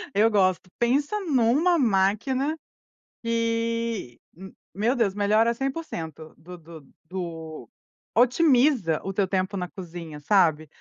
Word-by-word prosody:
Eu 220 Hz, +2 st, +5 dB
gosto. 185 Hz, -4 st, +1 dB
Pensa 285 Hz, -, +1 dB
numa 295 Hz, +3 st, +2 dB
máquina 240 Hz, +7 st, +1 dB, 0.7 s
que, 230 Hz, -, -2 dB, 0.2 s
m 190 Hz, +2 st, -11 dB, 0.2 s
meu 225 Hz, +7 st, 0 dB
Deus, 225 Hz, -5 st, +1 dB
melhora 215 Hz, +3 st, +2 dB
100% 225 Hz, -, -5 dB
do 180 Hz, +2 st, -12 dB
do 160 Hz, -4 st, -13 dB, 0.2 s
do 160 Hz, -, -7 dB, 0.5 s
otimiza 250 Hz, -, +3 dB
o 195 Hz, -, -4 dB
teu 195 Hz, 0 st, +1 dB
tempo 190 Hz, +1 st, -1 dB
na 180 Hz, -2 st, -3 dB
cozinha, 170 Hz, -5 st, -9 dB
sabe. 155 Hz, -2 st, +2 dB
205 Hz, 115 wpm, -25 LUFS, 175-240 Hz, 0.7 s, Eu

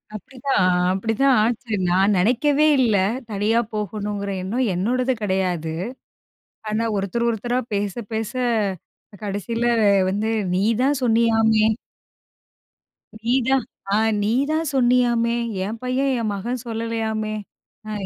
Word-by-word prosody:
அப்டித்தான், 265 Hz, +5 st, -3 dB
அ 180 Hz, 0 st, +2 dB
அப்டிதான் 225 Hz, +7 st, +2 dB
ஆச்சு! 230 Hz, 0 st, -2 dB, 0.2 s
நான் 195 Hz, +3 st, +3 dB
நெனைக்கவே 280 Hz, +9 st, +3 dB
இல்ல. 230 Hz, -5 st, +3 dB, 0.4 s
தனியா 210 Hz, +3 st, +1 dB
போகணுங்குற 205 Hz, -1 st, -3 dB
எண்ணம் 235 Hz, +7 st, -1 dB
என்னோடது 250 Hz, +7 st, 0 dB
கெடையாது. 185 Hz, -5 st, -1 dB, 1.0 s
ஆனா, 220 Hz, +2 st, 0 dB
ஒருத்தர், 215 Hz, +5 st, -1 dB
ஒருத்தரா 240 Hz, +2 st, -1 dB
பேச, 200 Hz, -1 st, -1 dB, 0.2 s
பேச, 220 Hz, -1 st, -2 dB, 0.9 s
கடைசியில 205 Hz, +4 st, -2 dB, 0.4 s
வந்து, 205 Hz, +3 st, -1 dB, 0.3 s
"நீதான் 235 Hz, +8 st, +1 dB
சொன்னீயாமே!" 225 Hz, -2 st, +3 dB, 1.6 s
"நீதான் 255 Hz, +2 st, +1 dB, 0.3 s
ஆ -, -, +4 dB, 0.3 s
நீதான் 280 Hz, +9 st, 0 dB
சொன்னீயாமே? 240 Hz, -2 st, +3 dB, 0.3 s
என் 220 Hz, +3 st, -4 dB
பையன், 260 Hz, +2 st, 0 dB
என் 220 Hz, -, -1 dB
மகன் 235 Hz, +5 st, -3 dB
சொல்லலையாமே! 225 Hz, -1 st, -2 dB, 0.5 s
அ 215 Hz, -, -5 dB
225 Hz, 105 wpm, -22 LUFS, 205-250 Hz, 1.6 s, ஆ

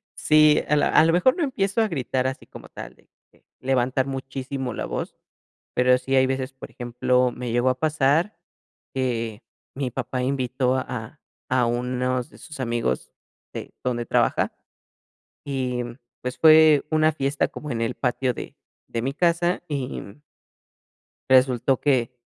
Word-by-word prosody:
Sí, 155 Hz, -1 st, +5 dB
a 150 Hz, -, +3 dB
la 145 Hz, -, +3 dB
a 155 Hz, -, +6 dB
lo 165 Hz, -, +3 dB
mejor 180 Hz, -, +4 dB
no 340 Hz, -, 0 dB
empiezo 225 Hz, -5 st, 0 dB
a 220 Hz, -, +1 dB
gritar 130 Hz, -5 st, -1 dB
así 130 Hz, 0 st, -4 dB
como -, -, -12 dB
tal, -, -, -9 dB
de -, -, -28 dB, 0.2 s
que, -, -, -29 dB, 0.2 s
levantar 130 Hz, 0 st, +1 dB
muchísimo 135 Hz, -1 st, -4 dB
la -, -, -3 dB
voz, -, -, -5 dB, 0.6 s
pero 125 Hz, 0 st, +4 dB
sí 135 Hz, +1 st, -1 dB
hay 130 Hz, -, +5 dB
veces, 130 Hz, 0 st, -2 dB
por 130 Hz, -, -10 dB
ejemplo, 125 Hz, +1 st, +1 dB
me 125 Hz, -1 st, -5 dB
llegó 120 Hz, +2 st, +2 dB
a 130 Hz, -, -2 dB
pasar 155 Hz, +6 st, +1 dB, 0.6 s
que 115 Hz, -4 st, -2 dB, 0.3 s
mi 130 Hz, -2 st, -2 dB
papá 125 Hz, +2 st, -3 dB
invitó 130 Hz, -1 st, 0 dB
a 125 Hz, +2 st, -5 dB, 0.3 s
a 125 Hz, -2 st, +3 dB
unos 125 Hz, +2 st, -1 dB
de -, -, -17 dB
sus 150 Hz, -4 st, -11 dB
amigos 115 Hz, -, -2 dB, 0.4 s
de -, -, -7 dB
donde 120 Hz, -2 st, -1 dB
trabaja -, -, +1 dB, 0.9 s
y, 130 Hz, -3 st, -2 dB
mm, 120 Hz, 0 st, -8 dB, 0.3 s
pues, 125 Hz, 0 st, -4 dB
fue 155 Hz, -2 st, +7 dB
una 155 Hz, 0 st, +3 dB
fiesta 140 Hz, -1 st, 0 dB
como 150 Hz, -, -8 dB
en 115 Hz, -3 st, -2 dB
el 115 Hz, -, -1 dB
patio 125 Hz, 0 st, 0 dB
de -, -, -8 dB, 0.3 s
de 115 Hz, -, -3 dB
mi 135 Hz, +3 st, -2 dB
casa 175 Hz, +2 st, +1 dB
y, 140 Hz, -3 st, -3 dB
mm 100 Hz, +9 st, -12 dB, 1.1 s
resultó 130 Hz, 0 st, +4 dB
que, 125 Hz, -4 st, +1 dB
130 Hz, 160 wpm, -24 LUFS, 125-145 Hz, 1.1 s, fue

